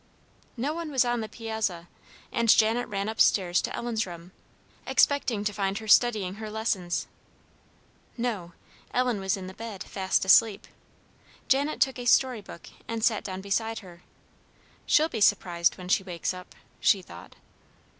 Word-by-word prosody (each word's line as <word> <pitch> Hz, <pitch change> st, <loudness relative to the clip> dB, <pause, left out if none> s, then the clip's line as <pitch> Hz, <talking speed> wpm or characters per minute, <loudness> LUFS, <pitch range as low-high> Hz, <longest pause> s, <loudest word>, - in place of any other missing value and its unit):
No 275 Hz, +6 st, -1 dB
one 335 Hz, -1 st, -5 dB
was 265 Hz, -4 st, +2 dB
on 240 Hz, -1 st, 0 dB
the 220 Hz, -, -5 dB
piazza, 220 Hz, -6 st, -3 dB, 0.4 s
and 235 Hz, -1 st, 0 dB
Janet 225 Hz, +3 st, +4 dB
ran 200 Hz, 0 st, -3 dB
up 220 Hz, 0 st, -1 dB
stairs 180 Hz, -3 st, +3 dB
to -, -, -4 dB
Ellen's 225 Hz, -3 st, -2 dB
room, 170 Hz, 0 st, -10 dB, 0.6 s
expecting 255 Hz, -7 st, +2 dB
to 210 Hz, 0 st, -1 dB
find 195 Hz, -1 st, -1 dB
her 220 Hz, -, -7 dB
studying 210 Hz, -5 st, +4 dB
her 215 Hz, -, -5 dB
lessons. 205 Hz, -5 st, -2 dB, 1.1 s
No; 210 Hz, -8 st, -3 dB, 0.4 s
Ellen 250 Hz, -4 st, +1 dB
was 190 Hz, 0 st, -1 dB
in 190 Hz, -, -7 dB
the 185 Hz, -, -8 dB
bed, 220 Hz, -2 st, -7 dB
fast 190 Hz, -1 st, -1 dB
asleep. 200 Hz, +2 st, +5 dB, 0.8 s
Janet 280 Hz, +3 st, +1 dB
took 265 Hz, -2 st, +1 dB
a 245 Hz, -, -6 dB
story 250 Hz, -2 st, +3 dB
book, 170 Hz, -, -12 dB, 0.2 s
and 230 Hz, -1 st, -4 dB
sat 220 Hz, -2 st, +2 dB
down 190 Hz, -1 st, -5 dB
beside 220 Hz, +3 st, -2 dB
her. 175 Hz, -1 st, -14 dB, 0.9 s
"She'll 310 Hz, +1 st, +4 dB
be 230 Hz, -9 st, -5 dB
surprised 175 Hz, -4 st, +2 dB
when 180 Hz, -1 st, -9 dB
she 185 Hz, -, +3 dB
wakes 180 Hz, -1 st, -3 dB
up," 180 Hz, 0 st, -11 dB, 0.2 s
she 195 Hz, -2 st, +3 dB
thought. 85 Hz, -, -13 dB
215 Hz, 160 wpm, -27 LUFS, 190-235 Hz, 1.1 s, asleep